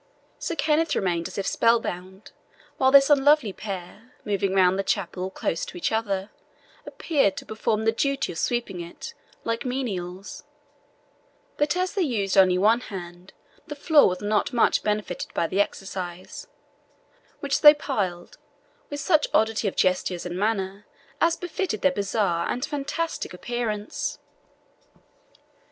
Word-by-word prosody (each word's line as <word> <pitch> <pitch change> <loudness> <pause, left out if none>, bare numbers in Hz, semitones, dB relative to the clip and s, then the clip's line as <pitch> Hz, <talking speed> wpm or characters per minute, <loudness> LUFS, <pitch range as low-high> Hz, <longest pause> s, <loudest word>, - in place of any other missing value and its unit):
Sir 335 - -3
Kenneth 310 +1 +1
remained 170 -3 0
as - - -10
if 195 - -2
spellbound, 190 -4 0 0.5
while 260 - +4
this 275 +1 +6
unlovely 285 -6 +4
pair, 200 +4 -8
moving 195 -2 0
round 185 0 +4
the - - +1
chapel 185 -1 -2
close 170 -3 -3
to - - -9
each 175 - -1
other, 205 -3 -1 0.6
appeared 275 - 0
to - - -6
perform 220 0 -1
the 225 - +4
duty 275 +2 -1
of 165 - -6
sweeping 235 -7 -2
it, 170 - -9 0.3
like 230 0 -2
menials; 195 -8 -4 1.1
but 295 +4 +1
as 370 0 -1
they 400 - 0
used 215 - 0
only 185 -2 +5
one 215 +5 +4
hand, 180 -4 -9 0.4
the 295 - -6
floor 295 - +5
was 180 0 -4
not 210 +3 0
much 240 -3 +3
benefited 210 -4 -3
by - - +1
the 190 +4 +1
exercise, 185 -3 -5 0.9
which - - -1
they 300 -2 +11
plied 200 -12 -3 0.5
with 290 - -5
such 310 -1 +3
oddity 220 0 +2
of 195 - -2
gestures 185 -1 0
and 175 0 -4
manner 200 0 -2 0.3
as 335 0 +3
befitted 355 - -3
their 280 - +5
bizarre 200 -6 -1
and 250 +3 -1
fantastic 290 - -3
appearance. 215 0 -3
210 Hz, 140 wpm, -25 LUFS, 185-275 Hz, 1.1 s, they